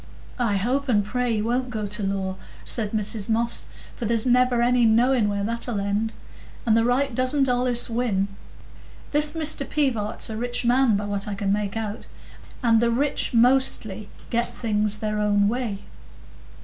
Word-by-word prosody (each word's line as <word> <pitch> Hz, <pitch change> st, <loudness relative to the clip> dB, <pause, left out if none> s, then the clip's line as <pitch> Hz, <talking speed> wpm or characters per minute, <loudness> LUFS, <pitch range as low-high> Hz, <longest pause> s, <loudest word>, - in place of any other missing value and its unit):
"I 220 Hz, -5 st, +1 dB
hope 260 Hz, +7 st, -1 dB
and 205 Hz, -4 st, +2 dB
pray 245 Hz, +2 st, -1 dB
he 210 Hz, -, -1 dB
won't 245 Hz, +3 st, -1 dB
go 215 Hz, -3 st, -3 dB
to 210 Hz, +2 st, -3 dB
law," 195 Hz, -1 st, -2 dB, 0.3 s
said 220 Hz, -4 st, 0 dB
Mrs 210 Hz, -1 st, -2 dB
Moss, 230 Hz, +1 st, 0 dB, 0.3 s
"for 240 Hz, -, -5 dB
there's 225 Hz, +1 st, +1 dB
never 250 Hz, -1 st, +3 dB
any 245 Hz, 0 st, +3 dB
knowing 230 Hz, 0 st, +3 dB
where 200 Hz, 0 st, -2 dB
that'll 230 Hz, 0 st, -2 dB
end. 205 Hz, +3 st, -1 dB, 0.5 s
And 220 Hz, -2 st, +3 dB
the 225 Hz, -, +3 dB
right 255 Hz, +2 st, +1 dB
doesn't 255 Hz, +3 st, +1 dB
allays 245 Hz, -1 st, +2 dB
win. 225 Hz, -5 st, 0 dB, 0.8 s
This 295 Hz, 0 st, +3 dB
Mr 310 Hz, -3 st, +1 dB
Pivart's 260 Hz, -8 st, -1 dB
a 215 Hz, -, -4 dB
rich 245 Hz, +1 st, -2 dB
man, 245 Hz, -3 st, +3 dB
by 205 Hz, -, -3 dB
what 200 Hz, 0 st, -3 dB
I 205 Hz, -, -3 dB
can 200 Hz, -1 st, 0 dB
make 205 Hz, 0 st, -2 dB
out, 215 Hz, -1 st, -5 dB, 0.6 s
and 230 Hz, -2 st, +4 dB
the 235 Hz, -, +2 dB
rich 275 Hz, +5 st, 0 dB
mostly 230 Hz, -4 st, +2 dB, 0.2 s
get 235 Hz, +1 st, 0 dB
things 215 Hz, -3 st, -1 dB
their 210 Hz, 0 st, -2 dB
own 205 Hz, -1 st, +2 dB
way." 220 Hz, -3 st, -2 dB
230 Hz, 170 wpm, -24 LUFS, 210-250 Hz, 0.8 s, and